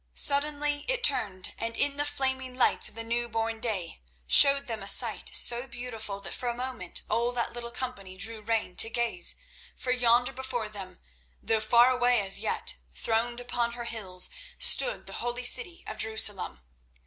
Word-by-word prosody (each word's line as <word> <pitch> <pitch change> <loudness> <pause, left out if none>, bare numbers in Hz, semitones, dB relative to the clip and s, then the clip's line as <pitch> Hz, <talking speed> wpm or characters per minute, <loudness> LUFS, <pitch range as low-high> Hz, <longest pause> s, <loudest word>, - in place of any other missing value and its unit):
Suddenly 290 0 +1
it - - -1
turned, 190 - 0
and 230 0 -3
in 285 0 +1
the 290 - 0
flaming 265 -3 -3
lights 255 - +1
of - - -16
the 230 - -6
new 235 +1 -3
born 225 0 -4
day 200 - -4 0.2
showed 280 - +5
them 225 -5 -6
a 195 - -8
sight 220 +2 +3
so 240 +2 +4
beautiful 240 -5 -8
that - - -6
for 245 - -4
a 235 - -4
moment 250 -8 -3
all 235 +1 -1
that 240 -1 -4
little 235 0 -5
company 200 -7 -7
drew 220 +2 -1
rein 220 -4 -3
to 225 - +5
gaze. 230 -6 +6 0.4
For 250 - -5
yonder 245 -1 +1
before 245 -4 -5
them, 190 -3 -7 0.4
though 220 -1 -1
far 235 +3 +4
away 245 -1 +1
as 195 -1 +1
yet, - - -2 0.2
throned 235 +1 -1
upon 240 -1 -2
her 240 0 -8
hills, 190 -6 +1 0.3
stood - - +4
the - - -9
holy 240 +1 -2
city 355 - +1
of 215 - -9
Jerusalem. 210 - +1
235 Hz, 175 wpm, -26 LUFS, 220-255 Hz, 0.4 s, gaze